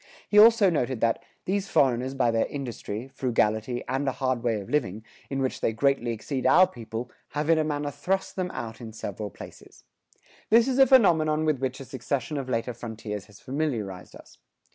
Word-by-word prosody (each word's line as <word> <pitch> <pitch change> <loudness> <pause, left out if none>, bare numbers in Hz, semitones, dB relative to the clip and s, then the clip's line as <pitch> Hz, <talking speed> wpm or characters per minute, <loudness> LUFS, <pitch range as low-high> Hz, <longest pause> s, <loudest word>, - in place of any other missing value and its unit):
He 210 - +5
also 220 -3 +7
noted 130 -6 -1
that 115 -1 +1 0.2
"these 195 +1 -1
foreigners 130 0 +2
by 125 -3 +2
their 115 0 +1
industry, 120 -4 -5
frugality, 120 -2 0
and 135 +2 -1
a 135 - +1
hard 130 -2 -1
way 115 -3 0
of 100 - -9
living, 110 -7 -1 0.2
in 135 -1 -1
which 130 - -2
they 110 - +1
greatly 125 0 +1
exceed 130 +4 -2
our 185 - +7
people, 120 -6 -7 0.2
have 150 +2 +1
in 160 - +4
a - - +2
manner 145 -1 -2
thrust 190 +6 -2
them 185 -1 -2
out 115 -8 -7
in 110 -2 -8
several 105 -1 -5
places."[110:1] - - -15 0.3
This 230 +2 +5
is 265 0 0
a 270 - +8
phenomenon 160 - +4
with 155 -4 +1
which 130 0 -3
a 135 - -8
succession 130 +2 -3
of 130 -1 -6
later 120 0 -1
frontiers 110 -3 -6
has 105 -1 -17
familiarized 120 - -4
us. - - -16
130 Hz, 190 wpm, -26 LUFS, 115-155 Hz, 0.3 s, a